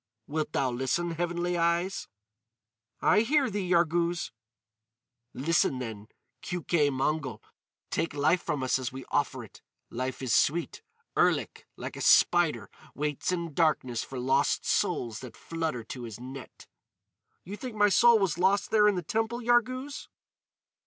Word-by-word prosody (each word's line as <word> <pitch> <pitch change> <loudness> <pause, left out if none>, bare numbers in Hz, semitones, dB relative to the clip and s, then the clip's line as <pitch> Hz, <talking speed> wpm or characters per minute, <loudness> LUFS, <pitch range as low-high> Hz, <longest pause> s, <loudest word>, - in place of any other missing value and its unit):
"Wilt 155 +2 -3
thou 130 -2 +1
listen, 135 +8 -1
Heavenly 175 +1 -1
Eyes?" 170 +3 0 1.0
"I 205 - +5
hear 270 +1 +2
thee, 195 -3 -3
Yarghouz." 170 -1 +1 1.0
"Listen 145 -1 +1
then, 110 -4 -6 0.3
Keuke 170 -4 0
Mongol. 135 -3 -2 0.5
Take 165 - -1
life 155 +5 +2
from 150 -5 -2
us 130 +1 +1
as 130 -2 -4
we 130 0 -8
offer - - 0
it. - - -15 0.3
Life 130 +2 -4
is 125 -4 0
sweet. 170 +4 +1 0.3
Erlik, - - +1
like - - -6
a - - -7
spider, 175 -3 +4 0.2
waits 150 +3 -2
in 170 -3 -3
darkness 135 -7 +1
for 135 - -8
lost 125 +1 +1
souls 115 -2 0
that 125 -2 -10
flutter 160 -7 -3
to 125 +2 -8
his 115 -1 -8
net." 130 +2 -10 0.8
"You 195 +4 -7
think 245 +1 -7
my 205 -1 +4
soul 235 +4 +6
was 195 -5 0
lost 195 +3 +2
there 210 -1 +5
in 205 - +3
the 180 - -3
temple, 225 +4 -1
Yarghouz?" 250 +3 0
165 Hz, 145 wpm, -28 LUFS, 130-190 Hz, 1.0 s, soul